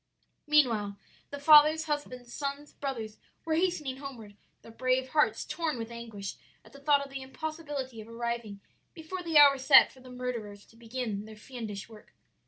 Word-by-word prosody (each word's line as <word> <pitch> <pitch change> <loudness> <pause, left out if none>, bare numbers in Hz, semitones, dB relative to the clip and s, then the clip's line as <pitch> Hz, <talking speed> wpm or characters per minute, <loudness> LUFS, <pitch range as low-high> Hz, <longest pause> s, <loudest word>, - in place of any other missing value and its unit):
"Meanwhile 230 -10 +3 0.3
the 285 - -6
fathers, 305 +2 +7
husbands, 255 -6 -4
sons, 280 +1 -5
brothers 230 -6 -5 0.3
were 320 - 0
hastening 315 -6 0
homeward, 240 -7 -9 0.3
their 230 - -12
brave 255 +2 0
hearts 300 +1 +2
torn 320 -5 -2
with 225 0 -6
anguish 225 -4 -7 0.3
at - - -18
thought 280 0 +2
of 275 - -14
the 270 0 -6
impossibility 285 -4 -6
of 215 - -12
arriving 230 -3 -4 0.3
before 340 +3 -6
the 330 -3 +1
hour 280 -2 +8
set 270 +1 +7
for 260 - -18
the 255 0 -14
murderers 235 -5 -6
to - - -22
begin 230 -3 -4
their 220 0 -11
fiendish 215 -3 -7
work. 220 -2 -16
260 Hz, 165 wpm, -30 LUFS, 230-295 Hz, 0.3 s, hour